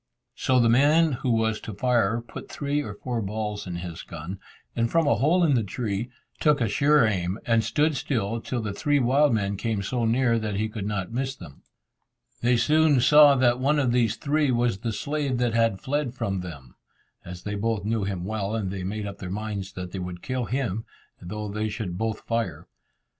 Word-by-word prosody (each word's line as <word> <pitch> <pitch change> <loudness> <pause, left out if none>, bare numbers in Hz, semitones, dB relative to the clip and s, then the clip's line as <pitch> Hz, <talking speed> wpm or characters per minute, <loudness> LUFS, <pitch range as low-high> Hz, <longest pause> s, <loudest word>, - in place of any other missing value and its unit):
So 130 -1 +2
the 120 - +4
man 150 +7 +4
who 125 0 -2
was 110 -1 +1
to 110 - -7
fire 115 -1 +1
put - - -9
three 145 0 -1
or 105 -6 -6
four 120 +1 -3
balls 105 0 -4
in 90 - -4
his 85 -1 -6
gun, 85 +4 -7 0.4
and 115 0 +1
from 165 -1 +2
a 145 - +4
hole 155 - +3
in 155 -4 +4
the 120 - +3
tree, 105 +2 -3 0.3
took 150 -2 +3
a 115 - +1
sure 140 +6 +4
aim, 95 -2 -1
and 115 -1 +3
stood 150 +7 +1
still 115 -5 -2
till 120 -1 -3
the 105 -2 -3
three 145 +8 +1
wild 140 +3 +3
men 100 -3 0
came 105 -1 -2
so 120 +3 -1
near 115 0 +2
that 105 -2 -3
he 110 +2 -1
could 105 -2 -5
not 100 -2 -3
miss 130 +3 -2
them. 70 - -13 0.8
They 120 0 +3
soon 155 +2 +4
saw 145 +2 +7
that 125 -1 +3
one 145 +3 +2
of 135 -4 +2
these 120 -3 +2
three 150 0 +1
was 120 -5 +1
the 115 +1 -2
slave 140 +3 -2
that 120 -1 0
had 115 -4 +2
fled 135 +1 -2
from 95 -6 -2
them, 70 -9 -9 0.5
as 90 0 -9
they 105 - -4
both 105 0 -1
knew 110 -1 0
him 95 -3 -3
well, 105 0 -2
and 100 -4 -2
they 95 -2 -4
made 105 +3 -3
up 100 -1 -7
their 90 - -6
minds 100 -1 -4
that 90 -1 -6
they 95 - -5
would 90 -1 -6
kill 130 -2 -2
him, 115 -4 -2 0.4
though 105 +4 -5
they 105 +1 -2
should 100 -5 -4
both 110 -1 -2
fire. 115 -10 -3
115 Hz, 210 wpm, -25 LUFS, 100-130 Hz, 0.8 s, saw